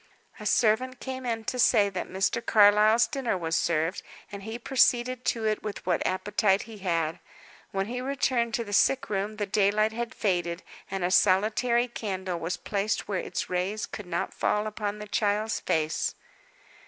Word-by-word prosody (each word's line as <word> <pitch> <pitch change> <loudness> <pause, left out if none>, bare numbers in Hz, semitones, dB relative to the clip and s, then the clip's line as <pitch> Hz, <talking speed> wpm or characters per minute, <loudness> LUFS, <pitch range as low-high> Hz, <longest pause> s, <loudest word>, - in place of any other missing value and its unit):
A 210 - -4
servant 245 +4 +2
came 255 -4 -4
to 250 +3 -3
say 230 -4 +5
that 185 -2 -5
Mr. 190 +5 0
Carlyle's 210 +2 +5
dinner 260 -8 -2
was 165 -2 -2
served, 165 +2 0 0.3
and 200 -1 -7
he 220 +3 -6
proceeded 250 0 +2
to 225 -2 0
it 215 -1 0
with 210 -1 -6
what 180 -2 +1
appetite 200 +1 +1
he 220 -2 -11
had. 165 -4 -1 0.5
When 195 0 -1
he 250 +4 -4
returned 255 -3 0
to 235 - -1
the 205 -2 -8
sick 260 +3 +2
room 205 +2 -1
the 210 - -1
daylight 210 +2 +2
had 235 +1 -5
faded, 175 -3 -1 0.3
and 195 -1 -3
a 175 - 0
solitary 220 +6 +3
candle 190 -6 -4
was 175 +2 -3
placed 205 +3 -2
where 195 -3 -1
its - - -4
rays 185 +4 -2
could 205 -4 -8
not - - -2
fall 210 0 0
upon 210 -1 -3
the 210 - -7
child's 210 +1 0
face. 155 0 -1
210 Hz, 170 wpm, -27 LUFS, 190-230 Hz, 0.5 s, say